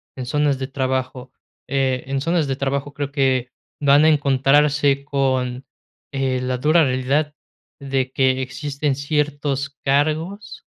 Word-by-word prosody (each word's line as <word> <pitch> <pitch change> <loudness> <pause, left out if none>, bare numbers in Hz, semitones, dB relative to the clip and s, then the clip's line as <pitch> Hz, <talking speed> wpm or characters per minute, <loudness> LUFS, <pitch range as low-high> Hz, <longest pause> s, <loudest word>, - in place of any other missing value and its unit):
en 130 - -5
zonas 145 +2 +1
de 130 0 -4
trabajo. 130 -1 -3 0.3
Eh, 130 -2 0
en 135 0 -2
zonas 165 0 +1
de 135 - -1
trabajo, 140 +1 -2
creo 145 -1 -4
que, 130 -3 +1 0.3
van 145 +1 +5
a - - +6
encontrarse 140 0 +3
con, 130 -2 -1 0.5
eh, 135 -2 0
la 125 0 -1
dura 155 +6 +4
realidad 135 +4 0 0.4
de 135 -2 -2
que 130 0 +1
existen 140 +2 -2
ciertos 140 -1 -1 0.2
cargos, 155 +9 -1
140 Hz, 135 wpm, -21 LUFS, 130-145 Hz, 0.5 s, a